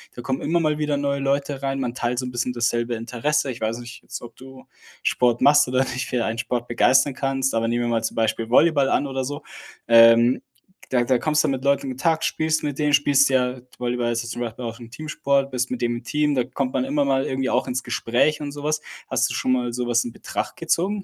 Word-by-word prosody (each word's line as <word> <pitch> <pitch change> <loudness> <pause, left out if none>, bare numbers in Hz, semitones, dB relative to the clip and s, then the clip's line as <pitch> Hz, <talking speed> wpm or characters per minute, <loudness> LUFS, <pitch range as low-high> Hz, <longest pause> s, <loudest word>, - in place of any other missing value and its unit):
da 120 - -8
kommen 130 +1 -2
immer 170 +3 +1
mal 155 -2 0
wieder 150 -1 0
neue 140 0 -1
Leute 140 0 -1
rein, 135 0 -2
man 125 -3 -2
teilt 120 -1 -2
so 130 - -2
'n 125 - -5
bisschen 125 0 -2
dasselbe 120 0 0
Interesse. 125 +5 -1
Ich 120 - -9
weiß 110 +1 -1
nicht 120 0 -10
jetzt, - - -8
ob 120 -1 -11
du 130 0 -13 0.4
Sport 120 -1 +2
machst 145 0 +6
oder 130 +1 +1
dich 125 0 -4
für 125 -2 -1
ein 115 +1 -3
Sport 120 0 -2
begeistern 130 +4 +3
kannst, 135 0 -1
aber 115 0 0
nehmen 120 +1 0
wir - - -1
mal 115 -1 0
zum 110 - -3
Beispiel 110 0 -1
Volleyball 140 +1 +4
an 145 - +1
oder 135 -1 -3
so, 145 +2 -5 0.4
ähm, 115 +1 +6 0.5
da 125 -2 +2
da 125 +1 +2
kommst 150 +4 +1
du - - +1
mit 135 0 -3
Leuten 140 0 +2
in - - -3
Kontakt, 160 +5 0
spielst 155 0 0
mit 145 -1 -3
denen, 150 -1 +1
spielst 145 -1 +4
ja 125 -1 +1 0.2
Volleyball 120 -1 -1
ist 120 0 -3
zum 120 - -5
Beispiel 120 +1 -5
auch 115 0 -6
'n 115 -1 -11
Teamsport, 140 -1 -1
bist 125 0 -1
mit 125 - -3
dem 120 0 0
im 120 - -10
Team 150 0 +1
da 125 -2 +1
kommt 135 -2 -3
man 130 -1 0
immer 145 +2 +1
mal 135 -1 +1
irgendwie 130 0 -1
auch 125 - 0
ins 125 +1 -2
Gespräch 120 +5 +1
und 145 -1 -4
sowas. 150 +1 -2 0.3
Hast - - +1
du - - -4
schon 130 - 0
mal 120 -2 -1
sowas 120 -1 0
in 120 - -6
Betracht - - -5
gezogen? 195 +4 -1
130 Hz, 245 wpm, -23 LUFS, 120-140 Hz, 0.5 s, machst